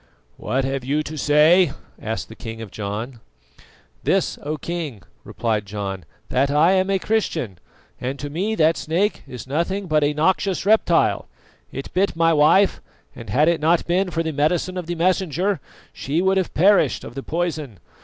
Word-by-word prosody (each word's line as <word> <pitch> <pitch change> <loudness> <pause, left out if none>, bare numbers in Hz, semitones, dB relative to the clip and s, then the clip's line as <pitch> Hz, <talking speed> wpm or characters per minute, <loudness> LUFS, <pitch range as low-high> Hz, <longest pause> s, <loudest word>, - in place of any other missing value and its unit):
"What 130 +1 -1
have 135 -1 -2
you 145 +4 0
to 155 - -7
say?" 150 +3 +4 0.3
asked 110 +1 -4
the 110 - -12
king 115 -1 -8
of 110 -4 -8
John. 110 +4 -5 0.8
"This, - - 0
O 150 +2 -3
King," 150 - -5 0.2
replied 110 -3 -2
John, 100 -3 -5 0.2
"that 135 +2 +1
I 150 +5 +4
am 190 0 +2
a 195 - +2
Christian, 170 - -2 0.4
and 130 +3 -3
to 145 +1 -6
me 195 +8 -1
that 160 -3 +3
snake 185 +7 0
is 125 -2 -8
nothing 170 +8 -2
but 155 -3 +2
a 145 +1 +2
noxious 185 +4 +1
reptile. 205 -5 +3 0.4
It 135 - -7
bit 190 0 +1
my 165 0 +3
wife, 160 +6 +4 0.3
and 115 -4 -10
had 145 +10 +3
it 170 -3 +2
not 165 +2 +2
been 180 +2 +1
for 165 -1 -1
the 160 -1 -3
medicine 160 +5 0
of 180 -3 -5
the 175 - -2
Messenger, 185 +1 0 0.3
she 145 +5 -2
would 190 +1 +2
have 185 - -1
perished 185 -4 +3
of - - -9
the 135 - -5
poison. 155 - -3
155 Hz, 175 wpm, -22 LUFS, 135-180 Hz, 0.8 s, say